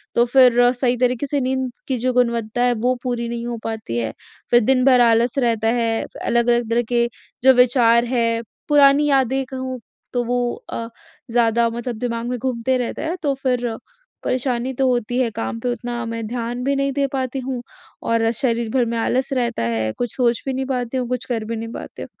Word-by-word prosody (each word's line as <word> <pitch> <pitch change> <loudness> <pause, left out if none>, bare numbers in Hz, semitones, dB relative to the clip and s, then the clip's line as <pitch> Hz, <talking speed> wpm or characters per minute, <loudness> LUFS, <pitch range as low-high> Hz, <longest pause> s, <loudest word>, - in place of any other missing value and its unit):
तो 235 - +4
फ़िर 245 -1 +5
सही 245 0 0
तरीके 250 +1 +1
से 285 +1 0
नींद 260 0 -1 0.2
की 260 - 0
जो 255 +2 0
गुणवत्ता 235 -1 +1
है 245 0 +3
वो 250 +2 +2
पूरी 240 -2 -2
नहीं 235 0 -4
हो 240 -1 -3
पाती 220 - -4
है। 115 -2 -1 0.4
फ़िर 240 0 +6
दिन 260 0 +3
भर 255 -2 +6
आलस 235 +2 +3
रहता 230 -3 +1
है, 230 -1 +1 0.2
अलग-अलग 235 -1 +2
तरह 235 +1 +2
के 235 -1 +2 0.4
जो 265 0 +8
विचार 240 -2 +4
हैं, 230 -2 0 0.3
पुरानी 290 0 +5
यादें 270 -1 +2
कहूँ 260 0 -5 0.3
तो 245 -1 +1
वो 245 0 0 0.2
अ, 230 - -4 0.4
ज़्यादा 235 0 +3
मतलब 235 +1 -4
दिमाग 235 -1 -2
में 250 - -2
घूमते 255 +1 0
रहता 245 -2 -3
है। 325 +2 -2
तो 285 -2 +2
फ़िर 245 -3 0 0.5
परेशानी 255 0 -1
तो 265 +1 +1
होती 245 0 0
है, 250 -2 +2
काम 230 +1 -4
पे 245 +2 -1
उतना 240 -1 -4
मैं 230 0 -4
ध्यान 240 +1 -4
भी 275 +2 +1
नहीं 275 0 0
दे 280 +1 +1
पाती 265 0 -2
हूँ 255 -1 -4 0.5
और 230 0 +2
शरीर 235 -3 0
भर 255 -2 +3
में 230 0 -2
आलस 255 +3 0
रहता 240 - -1
है, 110 -1 -1
कुछ 245 -2 -3
सोच 240 -2 +2
भी 270 - -1
नहीं 265 +1 -2
पाती 255 -1 -2
हूँ, 250 -1 -1
कुछ 250 -1 -2
कर 230 -3 -3
भी 230 +1 -3
नहीं 225 0 -5
पाते। - - -8
245 Hz, 205 wpm, -21 LUFS, 230-255 Hz, 0.5 s, जो